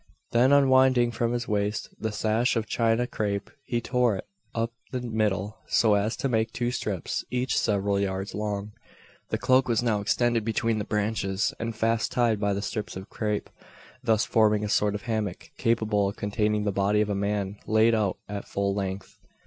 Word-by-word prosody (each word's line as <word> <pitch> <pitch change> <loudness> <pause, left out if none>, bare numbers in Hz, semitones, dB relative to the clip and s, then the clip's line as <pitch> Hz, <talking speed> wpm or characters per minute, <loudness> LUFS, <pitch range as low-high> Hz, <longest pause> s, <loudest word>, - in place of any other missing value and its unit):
Then 125 +3 +4
unwinding 130 -3 +5
from 115 0 -1
his 120 0 -2
waist 105 0 -1
the 110 - -2
sash 110 +4 +1
of 115 -1 0
china 115 +1 +1
crape, 105 -4 -3
he 120 - -1
tore 125 -3 +2
it 95 - -6 0.3
up 115 0 0 0.2
the 130 - -2
middle, 110 -3 -1
so 110 -3 +4
as 105 +3 +1
to - - -1
make 115 -2 0
two 120 +1 -1
strips, 100 -7 -3
each 125 +1 -1
several 100 -1 +1
yards 95 0 -2
long. 105 0 -3 0.6
The - - 0
cloak 130 0 +3
was 115 -1 +1
now 110 -4 +1
extended 120 +2 +1
between 115 0 0
the 105 - -3
branches, 105 -2 0
and 115 -1 -3
fast 115 +1 0
tied 115 -4 +2
by 100 -1 +1
the 100 +1 -3
strips 105 -2 -4
of 95 +2 -8
crape 105 -2 -2 0.6
thus 110 -2 +2
forming 105 -2 +3
a 105 - -2
sort 105 0 +2
of 105 - -5
hammock 110 -6 -3
capable 110 -3 +2
of 100 - -7
containing 105 +1 0
the 105 - 0
body 100 +2 +2
of 105 - 0
a - - +1
man 100 0 -1
laid 110 +1 +4
out 105 -4 +1
at 100 -1 -6
full 100 0 -1
length. 95 -1 -4
110 Hz, 190 wpm, -27 LUFS, 100-115 Hz, 0.6 s, unwinding